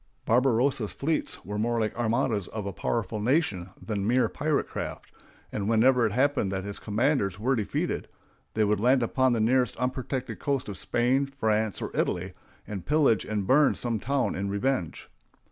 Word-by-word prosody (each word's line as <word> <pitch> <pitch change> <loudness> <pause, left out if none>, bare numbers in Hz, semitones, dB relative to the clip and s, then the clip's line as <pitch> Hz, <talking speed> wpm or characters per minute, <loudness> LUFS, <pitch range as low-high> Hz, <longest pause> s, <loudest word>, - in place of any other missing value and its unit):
Barbarossa's 125 -1 +2
fleets 155 - -2
were 105 +2 -4
more 115 +2 +1
like 110 -1 -1
armadas 115 -3 0
of 110 -2 -5
a 100 - -4
powerful 110 +1 -2
nation 105 - 0
than 100 -2 -3
mere 125 +2 +3
pirate 150 0 0
craft; - - -6 0.4
and 105 0 -2
whenever 120 +1 +4
it - - -4
happened 130 -4 +1
that 95 -1 -2
his 100 0 -6
commanders 110 -3 0
were 130 +5 +1
defeated, 110 -4 -2 0.5
they 110 - +3
would 105 -1 +2
land 125 +3 +3
upon 130 +2 +2
the 115 - 0
nearest 125 +1 +2
unprotected 130 +1 -3
coast 140 -3 -1
of 100 -2 -6
Spain, 130 +4 +1
France, 110 -7 -1
or - - -6
Italy, - - -1 0.3
and 100 -4 -6
pillage 145 -9 +3
and 105 -2 -2
burn 140 +5 +4
some 115 -3 -1
town 135 +4 0
in 100 +1 -3
revenge. 100 - -2
115 Hz, 170 wpm, -27 LUFS, 105-130 Hz, 0.5 s, whenever